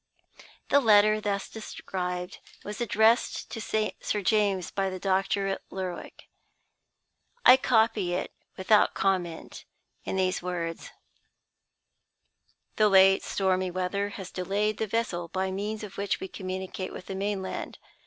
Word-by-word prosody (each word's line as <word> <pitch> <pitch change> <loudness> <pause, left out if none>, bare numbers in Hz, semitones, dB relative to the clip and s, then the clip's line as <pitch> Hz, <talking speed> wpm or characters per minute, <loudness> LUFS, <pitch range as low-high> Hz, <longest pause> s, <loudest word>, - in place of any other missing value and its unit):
The 285 - +6
letter 215 -3 +5
thus 200 -1 -2
described 180 -4 -5 0.2
was 210 +3 -6
addressed 225 +1 +2
to 225 - -5
Sir 215 -1 -2
James 195 -3 +1
by 195 -1 -1
the 185 - -5
doctor 195 +1 0
at 195 0 -2
Lerwick. 185 -2 -6 1.2
I 255 - +10
copy 220 -8 +2
it - - -4 0.2
(without 205 +3 +3
comment) 180 -4 -2 0.4
in - - -3
these 185 -1 0
words: 170 -2 -4 1.9
"The 215 -1 +5
late 195 0 +6
stormy 185 -1 0
weather 185 +3 -2
has 190 -3 -8
delayed 200 +3 -1
the 220 - -1
vessel 195 -6 -2
by 190 +2 -2
means 210 +3 -4
of 200 -2 -8
which 200 -1 -1
we 190 - -5
communicate 185 0 -5
with 180 - -9
the - - -6
mainland. 195 0 -3
195 Hz, 130 wpm, -28 LUFS, 185-210 Hz, 1.9 s, I